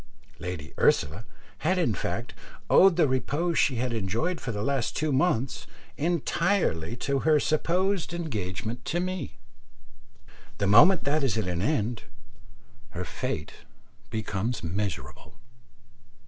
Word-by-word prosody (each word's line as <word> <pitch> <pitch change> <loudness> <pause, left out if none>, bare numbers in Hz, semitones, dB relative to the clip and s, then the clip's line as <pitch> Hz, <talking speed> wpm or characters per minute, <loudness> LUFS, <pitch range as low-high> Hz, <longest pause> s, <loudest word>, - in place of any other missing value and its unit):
Lady 85 -6 -6
Ursula 80 +9 +2 0.3
had 185 +4 +1
in 165 -11 +2
fact 95 +5 -4 0.4
owed 190 -2 +7
the 165 -3 +4
repose 145 +6 0
she 135 - +3
had 120 +1 -1
enjoyed 115 - -1
for 125 - -3
the 105 -1 -3
last 135 -2 -1
two 155 0 0
months 135 -3 0 0.3
entirely 165 - 0
to 135 +3 -1
her 155 +1 +4
supposed 175 +5 0
engagement 115 - -4
to 175 - -1
me. 185 -4 -4 1.2
The 100 - 0
moment 135 - +6
that 145 +2 +1
is 125 -4 +1
at 110 - 0
an 90 -1 -2
end, 120 -3 0 1.0
her 90 - -2
fate - - -4 0.6
becomes 110 +1 -3
miserable. 80 -7 -4
130 Hz, 125 wpm, -27 LUFS, 105-165 Hz, 1.2 s, owed